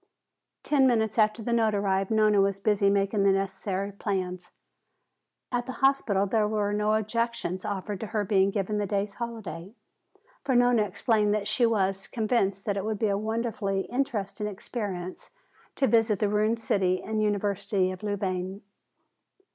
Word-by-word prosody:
Ten 275 -3 +4
minutes 220 -2 +1
after 215 +1 +2
the 235 - -1
note 220 -2 +2
arrived, 195 -1 0
Nona 215 -2 +4
was 195 0 +1
busy 200 0 +2
making 200 +1 +1
the 195 0 +5
necessary 195 0 -2
plans. 185 -3 -3 1.0
At 245 0 -1
the 260 - -4
hospital 250 -8 +2
there 210 +1 +1
were 210 -1 0
no 210 +1 +2
objections 220 -4 -2
offered 205 -1 -4
to 220 - -5
her 210 -1 -1
being 195 0 +3
given 205 +1 -1
the 205 - -1
day's 200 0 -1
holiday. 220 -5 -6 0.7
For 265 -2 0
Nona 245 -2 +4
explained 210 -1 +1
that 210 -1 -2
she 240 - +2
was 195 -3 0
convinced 210 -4 0
that 205 -2 -1
it 195 - -2
would 215 0 -2
be 215 +1 +1
a 200 - +1
wonderfully 215 -2 -1
interesting 210 -6 -2
experience 195 -3 -6 0.5
to 275 - +2
visit 225 -4 +3
the 205 +2 +1
ruined 215 +2 +1
city 185 -4 0
and 215 0 -2
University 200 -2 0
of 185 - -8
Louvain. 195 -2 -3
205 Hz, 160 wpm, -27 LUFS, 195-220 Hz, 1.0 s, the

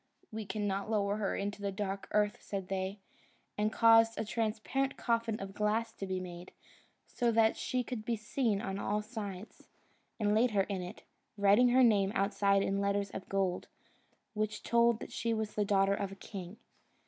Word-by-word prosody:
"We 215 -2 -5
cannot 205 -1 -2
lower 205 -2 +1
her 205 -2 -1
into 205 +1 -3
the 200 -1 -1
dark 195 0 -4
earth," 210 0 +1
said 195 -2 -5
they; 190 +1 -2 0.6
and 210 +1 0
caused 225 0 +5
a 220 - -2
transparent 225 +5 -1
coffin 230 -2 0
of 195 0 -6
glass 220 +2 0
to 195 - -6
be 185 0 -2
made, 175 -1 -8 0.5
so 240 -2 0
that 220 0 +4
she 255 -1 -1
could 240 -3 -5
be 230 +1 -1
seen 215 -1 -1
on 195 0 -3
all 210 +1 -1
sides, 210 -3 -7 0.5
and 210 -1 +2
laid 230 +4 +4
her 195 - +5
in 190 -1 -3
it, 180 0 -8 0.3
writing 205 +5 +5
her 255 +1 +5
name 200 -4 +4
outside 200 0 +2
in 195 0 0
letters 200 0 0
of 190 - -7
gold, 190 -2 -1 0.7
which 215 0 -2
told 235 -1 +3
that - - -7
she 230 -1 -1
was 220 -1 -3
the 210 - 0
daughter 195 -1 +3
of 200 -1 -2
a - - -8
king. 195 0 -8
210 Hz, 185 wpm, -32 LUFS, 195-225 Hz, 0.7 s, caused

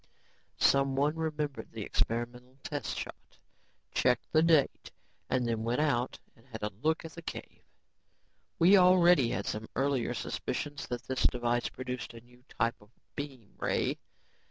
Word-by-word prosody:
Someone 140 +2 +3
remembered 150 -3 -3
the 110 -2 -4
experimental 120 +4 -2
test 145 -2 -3
shot, - - -8 0.6
checked 125 -2 +2
the 155 - +5
date 160 -4 +3 0.4
and 125 -1 +1
then 115 -1 -1
went 120 +3 0
out 130 -5 +1 0.2
and 115 - -22
had 110 -4 -8
a 105 - -1
look 160 +2 +1
at 165 - -7
the 170 - -9
cave. - - -8 1.0
We 185 +4 +7
already 180 -7 +6
had - - -2
some 110 +1 -4
earlier 135 -3 +1
suspicions 145 -1 -4
that 120 -1 -4
this 130 0 -3
device 120 -1 0
produced 125 -2 -6
a 115 - -10
new 125 +1 -22
type 115 -1 -1
of 105 - -19 0.3
beam 135 -7 -7
ray. - - 0
130 Hz, 150 wpm, -31 LUFS, 120-150 Hz, 1.0 s, We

